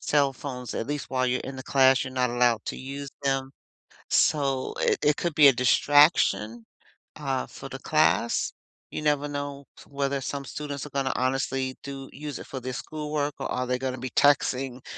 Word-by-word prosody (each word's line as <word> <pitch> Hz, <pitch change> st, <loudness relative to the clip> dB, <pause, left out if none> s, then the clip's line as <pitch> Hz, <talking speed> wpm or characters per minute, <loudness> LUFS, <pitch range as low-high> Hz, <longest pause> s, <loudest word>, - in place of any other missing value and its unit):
cell 140 Hz, -2 st, +2 dB
phones, 125 Hz, -2 st, -6 dB
at -, -, -3 dB
least 145 Hz, 0 st, -3 dB
while 130 Hz, -1 st, 0 dB
you're 125 Hz, +1 st, 0 dB
in 135 Hz, 0 st, -7 dB
the 130 Hz, -, -6 dB
class, 135 Hz, 0 st, +4 dB
you're 130 Hz, -, -7 dB
not 125 Hz, -1 st, +1 dB
allowed 120 Hz, -3 st, +2 dB
to -, -, -3 dB
use 140 Hz, +1 st, -6 dB
them. 135 Hz, -1 st, 0 dB, 0.6 s
So, 135 Hz, -3 st, +2 dB
it -, -, +2 dB
it 150 Hz, 0 st, +3 dB
could 170 Hz, -3 st, -2 dB
be 145 Hz, -2 st, +8 dB
a -, -, +7 dB
distraction, 130 Hz, -3 st, +3 dB, 0.5 s
uh, 135 Hz, -3 st, -2 dB
for -, -, -10 dB
the -, -, -6 dB
class. -, -, +2 dB, 0.4 s
You -, -, -5 dB
never 145 Hz, -1 st, +1 dB
know 145 Hz, -1 st, -5 dB, 0.2 s
whether 140 Hz, -1 st, -2 dB
some 140 Hz, +1 st, -4 dB
students 145 Hz, 0 st, -5 dB
are 150 Hz, -, -8 dB
gonna 135 Hz, -1 st, 0 dB
honestly 130 Hz, 0 st, -1 dB
do 135 Hz, -1 st, -7 dB
use 150 Hz, 0 st, -6 dB
it -, -, -9 dB
for 130 Hz, -, -5 dB
their 130 Hz, +1 st, -5 dB
schoolwork, 150 Hz, +1 st, -3 dB
or -, -, -3 dB
are 125 Hz, 0 st, -1 dB
they 125 Hz, 0 st, 0 dB
gonna 130 Hz, 0 st, -3 dB
be 130 Hz, +1 st, -5 dB
texting 135 Hz, -2 st, +2 dB
135 Hz, 190 wpm, -26 LUFS, 130-145 Hz, 0.6 s, be